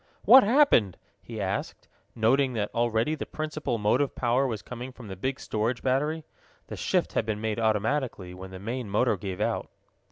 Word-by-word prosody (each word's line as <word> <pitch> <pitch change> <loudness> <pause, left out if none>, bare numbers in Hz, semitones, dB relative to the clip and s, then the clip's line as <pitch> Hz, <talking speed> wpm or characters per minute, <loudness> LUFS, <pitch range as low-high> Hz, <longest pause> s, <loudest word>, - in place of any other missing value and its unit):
"What 260 0 +9
happened?" 210 - +4 0.2
he - - -8
asked, - - -3 0.3
noting 130 +4 +2
that 105 -3 -2
already 115 +4 +1
the 155 - -5
principal 155 -5 -3
motive 120 +7 +1
power 125 +2 +1
was 110 -5 -4
coming 125 +1 -7
from 125 -3 -12
the 95 - -6
big 130 +8 -3
storage 115 +3 -2
battery. 150 +5 0 0.5
The - - -5
shift - - 0
had - - +1
been 110 -1 -3
made 110 0 -2
automatically, 110 -3 0
when 95 +1 -9
the 95 - -9
main 115 +3 -4
motor 105 +3 +2
gave 95 -1 -6
out. - - -1
120 Hz, 180 wpm, -27 LUFS, 105-135 Hz, 0.5 s, What